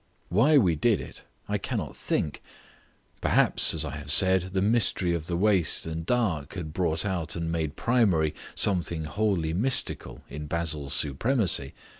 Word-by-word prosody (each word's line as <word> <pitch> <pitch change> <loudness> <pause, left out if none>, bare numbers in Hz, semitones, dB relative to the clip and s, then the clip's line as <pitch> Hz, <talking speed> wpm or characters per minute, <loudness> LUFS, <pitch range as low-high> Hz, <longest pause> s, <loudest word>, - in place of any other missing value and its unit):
Why 125 - +4
we 90 - +3
did 100 +6 +1
it - - -10 0.2
I - - -2
cannot - - -4
think; 75 - -3 0.8
perhaps, - - +3
as 80 -1 0
I 70 -1 -6
have 70 -1 -6
said, 95 +3 +5
the 95 - -1
mystery 100 -4 +2
of 80 -2 -4
the 85 - -2
waste 95 -4 +2
and 80 +1 -6
dark 95 - -1
had 80 -5 -6
brought 85 0 0
out 90 -5 -3
and 85 -1 -3
made 80 -3 -3
primary 95 -11 +1 0.2
something 85 -4 +1
wholly 85 -2 -1
mystical 120 +9 +1
in 75 +1 -8
Basil's 75 -4 -1
supremacy. 85 - 0
85 Hz, 155 wpm, -26 LUFS, 80-100 Hz, 0.8 s, said